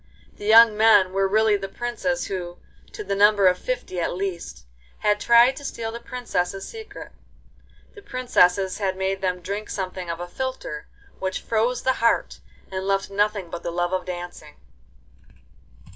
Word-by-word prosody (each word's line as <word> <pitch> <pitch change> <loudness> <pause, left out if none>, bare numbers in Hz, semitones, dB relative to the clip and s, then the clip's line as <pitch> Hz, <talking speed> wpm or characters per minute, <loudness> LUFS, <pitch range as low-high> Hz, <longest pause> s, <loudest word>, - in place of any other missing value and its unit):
The 205 - -8
young 225 0 +8
men 210 -4 +5
were 195 0 +2
really 215 +1 +3
the 195 -1 -6
princes 240 +4 -2
who, 175 -2 -5 0.3
to 425 - -7
the - - -3
number 205 0 +4
of 180 -1 +4
fifty - - -4
at 170 - -1
least, 170 - -5 0.3
had 210 0 +1
tried 235 +3 +5
to 285 - -9
steal 225 -4 -4
the 235 - -7
princesses' 195 -6 -3
secret. 440 -2 -10 0.8
The 410 - -13
princesses 195 - +1
had 190 -2 -1
made 190 0 -2
them 180 -1 -1
drink 200 +4 -5
something 185 -2 -5
of 170 0 -4
a 175 - -5
philtre, 255 - -5 0.3
which 190 0 -3
froze 230 +2 0
the 260 - +3
heart 230 - +1 0.3
and 190 0 -4
left 195 0 0
nothing 205 -3 0
but - - -5
the - - -4
love 175 +1 -1
of 185 -1 -1
dancing. 175 -4 -8
195 Hz, 165 wpm, -23 LUFS, 185-230 Hz, 0.8 s, young